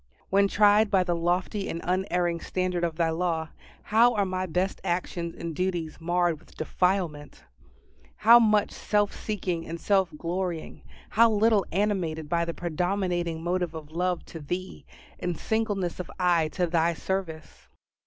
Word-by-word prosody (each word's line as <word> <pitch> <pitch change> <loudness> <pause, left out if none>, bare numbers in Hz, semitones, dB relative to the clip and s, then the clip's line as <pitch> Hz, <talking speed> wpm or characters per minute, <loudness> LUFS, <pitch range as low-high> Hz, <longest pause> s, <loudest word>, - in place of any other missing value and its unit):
When 200 +1 +4
tried 210 +1 +4
by 190 -2 +3
the 175 -1 -1
lofty 180 +4 -1
and 165 - -3
unerring 180 -2 0
standard 185 -1 -2
of 165 -2 -1
Thy 165 -1 +1
law, 165 -1 -1 0.3
how 235 +3 +4
are 205 -2 +2
my 185 0 -2
best 180 +3 -1
actions 175 -1 -2
and 165 -2 -5
duties 175 -3 -2
marred 175 -1 +1
with - - -21
defilement! 160 - -1 0.7
How 230 +3 +7
much 215 -3 +3
self 205 -1 0
seeking 180 -5 -3
and 165 +1 -5
self 190 -2 +2
glorying 175 0 -4 0.3
how 230 +1 +5
little 215 -2 +3
animated 175 -6 -1
by 170 0 +1
the 170 - -3
predominating 175 -1 -1
motive 175 -1 -1
of 155 -1 -8
love 180 +1 -1
to 165 - -9
Thee, 180 +5 -6 0.3
and 175 -2 -2
singleness 205 -6 -1
of 180 - -5
eye 175 -3 +3
to 180 - +1
Thy 170 0 +1
service! 175 -3 -5
180 Hz, 155 wpm, -27 LUFS, 170-195 Hz, 0.7 s, How